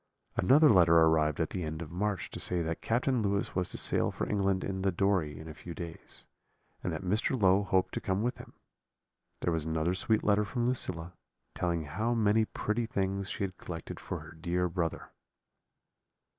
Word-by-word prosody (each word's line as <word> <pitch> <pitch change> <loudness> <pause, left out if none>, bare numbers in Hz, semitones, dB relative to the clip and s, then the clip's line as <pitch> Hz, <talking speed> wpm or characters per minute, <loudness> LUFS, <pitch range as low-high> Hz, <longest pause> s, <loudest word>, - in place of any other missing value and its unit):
"Another 145 - +6
letter 85 - +6
arrived 80 -2 +4
at 80 - 0
the 90 - -3
end 80 0 -4
of 75 - -11
March 100 +2 -2
to - - -4
say 90 -2 +1
that 80 +1 -3
Captain 125 +1 +1
Lewis 100 -1 0
was 90 -1 0
to - - -6
sail - - +2
for - - -3
England 100 -2 +1
in 95 -1 -3
the 95 0 +2
Dory 90 -5 0
in 80 - -9
a 80 - -7
few 85 +2 -9
days, 85 -2 -8 0.6
and 90 - -1
that 80 +1 -4
Mr. 110 +7 0
Low 95 0 +5
hoped 95 -2 +1
to - - -3
come 95 +2 -1
with 125 - -1
him. - - -12 0.9
There 85 - +1
was 80 -2 -1
another 80 +2 0
sweet 105 +4 +1
letter 105 0 +3
from 120 +4 -2
Lucilla, 90 -9 0 0.4
telling 85 -2 -1
how 110 +11 -1
many 110 0 +3
pretty 110 +2 -2
things 100 -1 -2
she - - -3
had 95 -2 -4
collected 85 -2 -7
for - - -5
her - - -11
dear 85 +2 -1
brother. 85 -2 -3
95 Hz, 195 wpm, -30 LUFS, 85-105 Hz, 0.9 s, Another